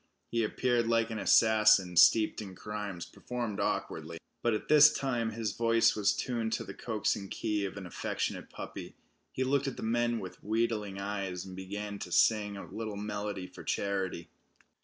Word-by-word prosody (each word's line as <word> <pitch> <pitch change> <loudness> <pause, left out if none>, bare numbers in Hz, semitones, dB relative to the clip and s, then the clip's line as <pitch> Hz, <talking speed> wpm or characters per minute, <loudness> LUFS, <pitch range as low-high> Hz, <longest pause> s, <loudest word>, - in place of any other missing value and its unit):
He 115 -1 +1
appeared 120 +1 +1
like 115 0 +2
an 110 - -3
assassin 105 -6 +5
steeped 110 +6 +5
in 95 -3 -8
crimes 105 -3 -5
performed 120 -4 -5
awkwardly. 80 +1 -2 0.2
But 120 -2 +2
at - - -5
this 150 0 +8
time 120 -6 -1
his 110 -1 -3
voice 115 +1 +3
was 105 -1 +2
tuned 115 -3 -2
to - - -1
the - - -8
coaxing 105 -3 -2
key 105 -3 -1
of 100 - -6
an 100 - -6
affectionate 90 - -3
puppy. - - -8 0.4
He 130 - -1
looked 140 +1 +1
at 135 - -4
the - - -6
men 120 +1 +1
with 95 - -9
wheedling 110 -2 -1
eyes, 100 -2 -4
and 95 -1 -9
began 100 +2 -5
to - - -7
sing 110 -3 +3
a - - -7
little 110 -2 -6
melody 105 -2 -4
for - - -11
charity. 95 -4 -2
105 Hz, 175 wpm, -31 LUFS, 100-115 Hz, 0.4 s, this